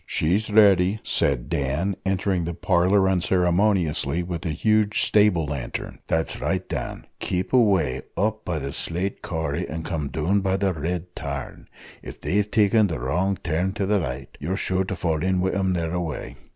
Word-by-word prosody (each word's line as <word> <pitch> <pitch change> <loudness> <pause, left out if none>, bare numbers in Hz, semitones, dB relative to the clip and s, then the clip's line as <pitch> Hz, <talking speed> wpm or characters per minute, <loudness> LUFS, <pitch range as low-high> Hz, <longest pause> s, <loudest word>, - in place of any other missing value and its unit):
"She's 95 +8 0
ready," 100 -2 +5
said - - +1
Dan, 75 +8 -1
entering 95 -2 0
the 85 0 -4
parlour 95 +2 +3
unceremoniously 90 -3 +1
with 85 -1 -5
a - - -1
huge 105 +6 +2
stable 105 -6 +3
lantern. 70 -4 -5
"That's 80 0 -1
right, - - -1
Dan - - -5
keep 90 +5 -2
away 95 - +3 0.2
up 110 +2 0
by 85 -3 -2
the 70 -2 -4
slate 90 +4 -3
corrie, 80 -3 -2
and 80 +1 -5
come 80 -4 -2
down 80 +8 +1
by 95 0 +1
the 95 -1 +1
red 90 +3 -4
tarn. 70 -3 -6 0.3
If - - -10
they've 105 +2 0
taken 105 0 +4
the 80 -5 -3
wrong 90 +10 0
turn 90 +4 0
to 100 - -1
the 105 +1 +2
right, 65 -3 -5
you're 90 +7 -2
sure 95 -1 0
to 95 - -3
fall 80 -2 -1
in 95 +1 +1
wi' 95 +1 +1
them 95 -1 0
thereaway. 85 -2 -3
90 Hz, 170 wpm, -24 LUFS, 80-100 Hz, 0.3 s, ready